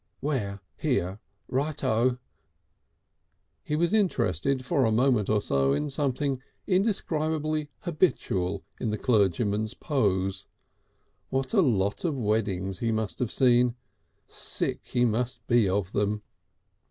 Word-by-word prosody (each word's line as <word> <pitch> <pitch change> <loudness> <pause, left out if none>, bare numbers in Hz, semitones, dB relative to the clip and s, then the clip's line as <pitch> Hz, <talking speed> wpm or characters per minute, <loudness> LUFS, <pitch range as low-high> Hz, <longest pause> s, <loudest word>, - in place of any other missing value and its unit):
"Where? 105 -9 -2 0.2
Here? 95 +4 -1 0.3
Right 145 +3 -2
O." 120 +3 +2 1.4
He 150 - -2
was 170 +4 +1
interested 135 - +1
for 140 -2 +2
a 110 - +3
moment 120 -2 +2
or 105 -1 +2
so 70 0 +2
in 150 - -1
something 135 -1 -1 0.2
indescribably 155 -6 0
habitual 100 - 0 0.2
in 115 - -1
the 105 - -1
clergyman's 105 -1 +1
pose. 95 - 0 0.8
What 135 +6 -1
a 205 - +5
lot 100 - +1
of 160 -6 0
weddings 100 -5 -1
he 115 -1 0
must 110 -2 -2
have 120 -4 -1
seen! 125 -2 +4 0.5
Sick - - -2
he 120 0 +2
must 120 +2 -1
be 120 -5 +3
of 95 -1 -1
them! 105 +1 0
120 Hz, 125 wpm, -27 LUFS, 100-145 Hz, 1.4 s, a